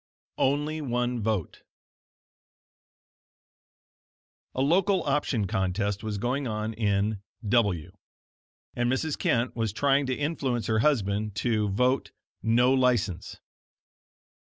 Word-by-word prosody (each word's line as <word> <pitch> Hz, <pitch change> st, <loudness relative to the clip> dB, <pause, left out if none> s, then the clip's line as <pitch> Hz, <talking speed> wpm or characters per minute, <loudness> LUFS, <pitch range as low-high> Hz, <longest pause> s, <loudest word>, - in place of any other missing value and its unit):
ONLY 150 Hz, +3 st, +1 dB
ONE 125 Hz, -3 st, -1 dB
VOTE 105 Hz, -6 st, -2 dB, 2.9 s
A 130 Hz, -, 0 dB
local 180 Hz, +5 st, +3 dB
option 135 Hz, -6 st, 0 dB
contest 95 Hz, +2 st, -1 dB
was 110 Hz, -2 st, -3 dB
going 125 Hz, +6 st, -1 dB
on 110 Hz, 0 st, -3 dB
in 105 Hz, -1 st, 0 dB, 0.3 s
W, 100 Hz, -7 st, +1 dB, 0.8 s
and 120 Hz, 0 st, +1 dB
Mrs. 145 Hz, +3 st, 0 dB
Kent 120 Hz, +1 st, 0 dB
was 115 Hz, -3 st, -1 dB
trying 140 Hz, +4 st, +2 dB
to 130 Hz, -, 0 dB
influence 135 Hz, -6 st, -1 dB
her 110 Hz, -1 st, +1 dB
husband 105 Hz, -6 st, +1 dB
to 110 Hz, -2 st, 0 dB
vote 125 Hz, +6 st, +1 dB, 0.3 s
"No 120 Hz, +3 st, +3 dB
License." 120 Hz, -9 st, 0 dB
120 Hz, 105 wpm, -27 LUFS, 105-135 Hz, 2.9 s, local